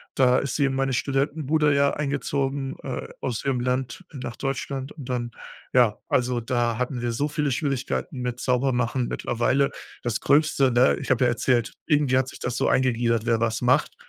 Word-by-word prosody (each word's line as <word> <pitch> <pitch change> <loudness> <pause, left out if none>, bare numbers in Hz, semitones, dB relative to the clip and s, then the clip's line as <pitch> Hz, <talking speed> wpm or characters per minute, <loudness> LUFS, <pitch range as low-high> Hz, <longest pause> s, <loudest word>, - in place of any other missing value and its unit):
da 125 -1 +4
ist 140 - -3
sie 145 - +3
in 135 - 0
meine 135 0 0
Studentenbude 145 +3 +1
ja 140 0 +3
eingezogen, 140 -1 -2
äh, 130 - -4
aus 120 -4 -3
ihrem 130 -3 0
Land 125 -1 -2
nach 130 -4 -6
Deutschland 135 0 -3
und 140 -6 -10
dann, 120 -2 -2 0.4
ja 120 -4 +4
also, 125 -1 +1
da 120 -1 0
hatten 125 0 -2
wir 120 -1 -1
so 145 +6 -1
viele 150 -2 -1
Schwierigkeiten 135 +1 -2
mit 125 -1 -3
Saubermachen. 125 -1 +1
Mittlerweile, 130 +4 +1 0.3
das 120 -1 -1
Gröbste, 145 -2 +3
ne? 120 +2 +4
Ich - - -3
habe 130 -1 +3
ja 120 - +4
erzählt, 120 0 +1
irgendwie 145 -4 +3
hat 130 0 +1
sich - - -10
das 125 0 -3
so - - +1
eingegliedert, 120 -3 +2
wer 115 -1 +2
was 115 0 0
macht. 125 +1 +2
130 Hz, 185 wpm, -25 LUFS, 120-140 Hz, 0.4 s, da